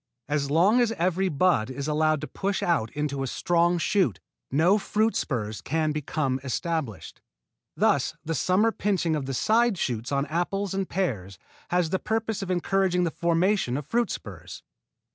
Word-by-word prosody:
As 145 Hz, -2 st, -1 dB
long 190 Hz, -, +4 dB
as 235 Hz, -2 st, +2 dB
every 185 Hz, 0 st, 0 dB
bud 145 Hz, -7 st, +2 dB
is 135 Hz, +2 st, -5 dB
allowed 155 Hz, 0 st, +1 dB
to 155 Hz, -, -5 dB
push 195 Hz, 0 st, -2 dB
out 165 Hz, -11 st, +1 dB
into 145 Hz, -2 st, -2 dB
a 135 Hz, -, -1 dB
strong 175 Hz, +5 st, +1 dB
shoot 175 Hz, -, +1 dB, 0.3 s
no 170 Hz, +9 st, +3 dB
fruit 215 Hz, +2 st, 0 dB
spurs 110 Hz, -6 st, -2 dB
can 155 Hz, +1 st, 0 dB
become 150 Hz, -3 st, -1 dB
established. 140 Hz, -, -3 dB, 0.6 s
Thus -, -, +2 dB
the 165 Hz, -, -1 dB
summer 185 Hz, -, +2 dB
pinching 190 Hz, -7 st, 0 dB
of 140 Hz, -3 st, -3 dB
the 135 Hz, -, -2 dB
side 225 Hz, -, +2 dB
shoots 120 Hz, -3 st, -2 dB
on 140 Hz, 0 st, +1 dB
apples 175 Hz, +5 st, -2 dB
and 195 Hz, -1 st, -2 dB
pears 105 Hz, -, -2 dB, 0.3 s
has 175 Hz, -2 st, +1 dB
the 190 Hz, -, +1 dB
purpose 220 Hz, -1 st, -2 dB
of 195 Hz, -, -5 dB
encouraging 185 Hz, 0 st, +1 dB
the 170 Hz, -, 0 dB
formation 170 Hz, -4 st, +1 dB
of 145 Hz, -, -5 dB
fruit 235 Hz, +8 st, 0 dB
spurs. -, -, -8 dB
170 Hz, 165 wpm, -26 LUFS, 140-195 Hz, 0.6 s, long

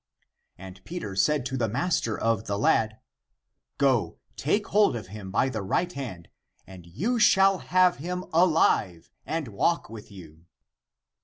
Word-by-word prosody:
And 95 Hz, +1 st, -12 dB
Peter 165 Hz, -, -6 dB
said 135 Hz, +7 st, +1 dB
to 130 Hz, 0 st, -3 dB
the 115 Hz, -3 st, 0 dB
master 125 Hz, -, -1 dB
of 115 Hz, -2 st, 0 dB
the 100 Hz, -, -1 dB
lad, 110 Hz, +1 st, +1 dB, 0.4 s
" -, -, -61 dB, 0.3 s
Go, 130 Hz, -5 st, +1 dB, 0.2 s
take 205 Hz, +9 st, 0 dB
hold 205 Hz, -8 st, +3 dB
of 105 Hz, -5 st, -7 dB
him 100 Hz, -1 st, -8 dB
by 105 Hz, +7 st, +1 dB
the 110 Hz, -5 st, -3 dB
right 175 Hz, -, -1 dB
hand, 110 Hz, -, -7 dB, 0.4 s
and 90 Hz, -3 st, -13 dB
you 205 Hz, -, -2 dB
shall 195 Hz, -2 st, +5 dB
have 185 Hz, -1 st, +2 dB
him 180 Hz, +4 st, -5 dB
alive 160 Hz, -, +2 dB, 0.2 s
and 160 Hz, -6 st, -3 dB
walk 110 Hz, +6 st, -1 dB
with 110 Hz, -2 st, -11 dB
you." 85 Hz, -3 st, -14 dB
120 Hz, 155 wpm, -26 LUFS, -, 0.4 s, shall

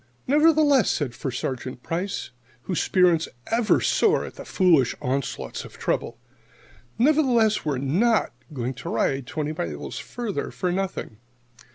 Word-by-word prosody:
"Nevertheless," 295 Hz, -, +4 dB
said 145 Hz, -7 st, -1 dB
First 130 Hz, -1 st, -4 dB
Sergeant 130 Hz, -1 st, -4 dB
Price, 180 Hz, -1 st, -3 dB, 0.3 s
whose 180 Hz, -, -1 dB
spirits 175 Hz, -4 st, +3 dB, 0.2 s
ever 230 Hz, -1 st, +3 dB
soar 445 Hz, 0 st, +2 dB
at -, -, -9 dB
the -, -, -10 dB
foolish 165 Hz, -, +3 dB
onslaughts 130 Hz, +1 st, -3 dB
of -, -, -12 dB
trouble 115 Hz, -, -2 dB, 0.8 s
"nevertheless, 245 Hz, -5 st, +3 dB
we're 145 Hz, -3 st, 0 dB
not 190 Hz, -, +2 dB, 0.2 s
going 130 Hz, -2 st, -3 dB
to 125 Hz, -, -7 dB
ride 135 Hz, +2 st, 0 dB
twenty 155 Hz, 0 st, -3 dB
miles 75 Hz, -, -5 dB
farther 235 Hz, -5 st, -4 dB
for 180 Hz, -, -2 dB
nothing. 185 Hz, -, -3 dB
175 Hz, 135 wpm, -24 LUFS, -, 0.8 s, Nevertheless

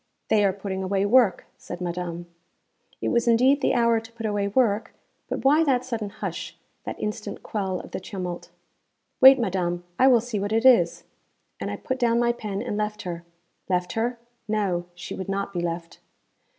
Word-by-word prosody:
'They 210 Hz, -1 st, +4 dB
are 195 Hz, -, +4 dB
putting 190 Hz, 0 st, -5 dB
away 195 Hz, +1 st, 0 dB
work,' 225 Hz, -3 st, +4 dB
said 175 Hz, -, -8 dB
madame. 175 Hz, -1 st, -4 dB, 0.8 s
It -, -, 0 dB
was 235 Hz, 0 st, +1 dB
indeed 255 Hz, +5 st, +4 dB
the -, -, +2 dB
hour 235 Hz, -1 st, +3 dB
to 225 Hz, +1 st, -13 dB
put 230 Hz, -1 st, -6 dB
away 205 Hz, -1 st, 0 dB
work, 210 Hz, -1 st, +1 dB, 0.3 s
but -, -, -4 dB
why 300 Hz, +4 st, +5 dB
that 255 Hz, -4 st, +1 dB
sudden 225 Hz, -5 st, -3 dB
hush, -, -, -6 dB, 0.3 s
that -, -, -5 dB
instant 210 Hz, 0 st, -5 dB
quell 190 Hz, -4 st, -2 dB
of -, -, -11 dB
the -, -, -4 dB
tumult? 180 Hz, -2 st, -6 dB, 0.7 s
'Wait, 265 Hz, +1 st, +10 dB
madam; 180 Hz, -6 st, -1 dB, 0.2 s
I 260 Hz, -, +6 dB
will 250 Hz, -3 st, +6 dB
see 225 Hz, -2 st, -3 dB
what 205 Hz, +2 st, -2 dB
it 225 Hz, +2 st, +1 dB
is.' 180 Hz, -10 st, +5 dB, 0.6 s
And -, -, -3 dB
I -, -, -3 dB
put 260 Hz, 0 st, -4 dB
down 235 Hz, -2 st, +3 dB
my 240 Hz, 0 st, +3 dB
pen 210 Hz, -3 st, -4 dB
and 225 Hz, -4 st, -3 dB
left 210 Hz, 0 st, -2 dB
her. 170 Hz, -2 st, -5 dB, 0.5 s
Left 180 Hz, -1 st, 0 dB
her? 235 Hz, +2 st, -1 dB, 0.3 s
No. 200 Hz, -5 st, 0 dB
She 180 Hz, 0 st, -7 dB
would 190 Hz, 0 st, -6 dB
not 200 Hz, 0 st, -2 dB
be 175 Hz, -, -2 dB
left. 170 Hz, 0 st, -4 dB
210 Hz, 190 wpm, -25 LUFS, 185-235 Hz, 0.8 s, Wait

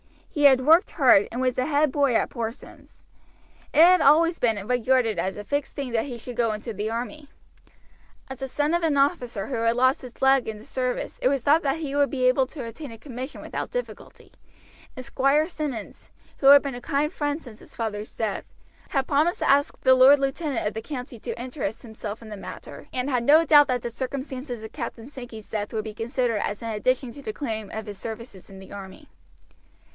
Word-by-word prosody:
He 295 Hz, -4 st, -2 dB
had 265 Hz, -2 st, +7 dB
worked 325 Hz, +4 st, +5 dB
hard, 250 Hz, -, +5 dB
and 245 Hz, -, -3 dB
was 255 Hz, -1 st, 0 dB
the 255 Hz, -, +1 dB
head 295 Hz, -1 st, +2 dB
boy 280 Hz, -4 st, +2 dB
at -, -, +1 dB
Porson's. 230 Hz, +2 st, -8 dB, 0.7 s
It 310 Hz, -, +5 dB
had 360 Hz, 0 st, +6 dB
always 330 Hz, +4 st, +4 dB
been 220 Hz, -5 st, 0 dB
regarded 245 Hz, -1 st, +1 dB
as 190 Hz, 0 st, -2 dB
a 205 Hz, -, -6 dB
fixed 285 Hz, +6 st, -3 dB
thing 275 Hz, -3 st, -4 dB
that 225 Hz, -1 st, 0 dB
he 250 Hz, -4 st, -6 dB
should 240 Hz, +1 st, -9 dB
go 230 Hz, -2 st, +2 dB
into 215 Hz, +2 st, -6 dB
the 210 Hz, +2 st, -3 dB
army. 250 Hz, +6 st, -5 dB, 1.0 s
As 265 Hz, -1 st, -7 dB
the 270 Hz, -, -4 dB
son 295 Hz, +4 st, -1 dB
of 345 Hz, -, +2 dB
an 315 Hz, -4 st, +1 dB
officer 245 Hz, -, 0 dB
who 260 Hz, -, -3 dB
had 230 Hz, +1 st, +1 dB
lost 260 Hz, +2 st, +3 dB
his 250 Hz, -2 st, -12 dB
leg 265 Hz, -1 st, +4 dB
in 220 Hz, -1 st, -4 dB
the 210 Hz, -, -13 dB
service 250 Hz, +1 st, -3 dB
it -, -, +3 dB
was 270 Hz, -2 st, +1 dB
thought 300 Hz, +5 st, +4 dB
that 285 Hz, +3 st, -1 dB
he 285 Hz, -3 st, -4 dB
would 285 Hz, -1 st, +3 dB
be 260 Hz, -2 st, -2 dB
able 255 Hz, +1 st, +3 dB
to 265 Hz, -2 st, -8 dB
obtain 235 Hz, +4 st, -8 dB
a 225 Hz, -, -10 dB
commission 255 Hz, +3 st, -7 dB
without -, -, -5 dB
difficulty, -, -, -7 dB, 0.6 s
and 255 Hz, -, -8 dB
Squire 275 Hz, +3 st, +2 dB
Simmonds, 295 Hz, -, -6 dB, 0.3 s
who 270 Hz, -, +1 dB
had 285 Hz, 0 st, +9 dB
been 280 Hz, -1 st, -3 dB
a 245 Hz, -, -8 dB
kind 290 Hz, +4 st, -1 dB
friend 290 Hz, 0 st, -2 dB
since 230 Hz, -6 st, -13 dB
his -, -, -16 dB
father's 215 Hz, -2 st, -4 dB
death, 220 Hz, -3 st, -2 dB, 0.4 s
had 270 Hz, -2 st, 0 dB
promised 305 Hz, +5 st, +2 dB
to -, -, 0 dB
ask 285 Hz, +1 st, +3 dB
the 260 Hz, -, +6 dB
lord 260 Hz, +3 st, +7 dB
lieutenant 275 Hz, 0 st, -2 dB
of 210 Hz, -, -1 dB
the 220 Hz, -, -4 dB
county 250 Hz, -2 st, -7 dB
to 235 Hz, -, -6 dB
interest 245 Hz, -3 st, -5 dB
himself 220 Hz, -1 st, -7 dB
in 220 Hz, -, -11 dB
the 210 Hz, -, -7 dB
matter, -, -, -10 dB
and 255 Hz, +2 st, -2 dB
had 250 Hz, -3 st, 0 dB
no 310 Hz, +4 st, +6 dB
doubt 290 Hz, -2 st, +7 dB
that 250 Hz, -2 st, -1 dB
the 240 Hz, -, -4 dB
circumstances 260 Hz, -1 st, -5 dB
of 220 Hz, -, -8 dB
Captain 230 Hz, +3 st, -6 dB
Sankey's 245 Hz, -6 st, -10 dB
death 205 Hz, -2 st, -3 dB
would 215 Hz, -1 st, -2 dB
be 215 Hz, -1 st, -7 dB
considered 230 Hz, +1 st, -1 dB
as 205 Hz, +2 st, -3 dB
an 230 Hz, -, -3 dB
addition 250 Hz, +4 st, 0 dB
to 280 Hz, -, -11 dB
the 215 Hz, -5 st, -5 dB
claim 220 Hz, -5 st, -4 dB
of 220 Hz, -1 st, -6 dB
his 205 Hz, -2 st, -8 dB
services 220 Hz, -4 st, -8 dB
in 195 Hz, -, -12 dB
the 190 Hz, 0 st, -13 dB
army. 200 Hz, +9 st, -10 dB
255 Hz, 220 wpm, -25 LUFS, 225-285 Hz, 1.0 s, had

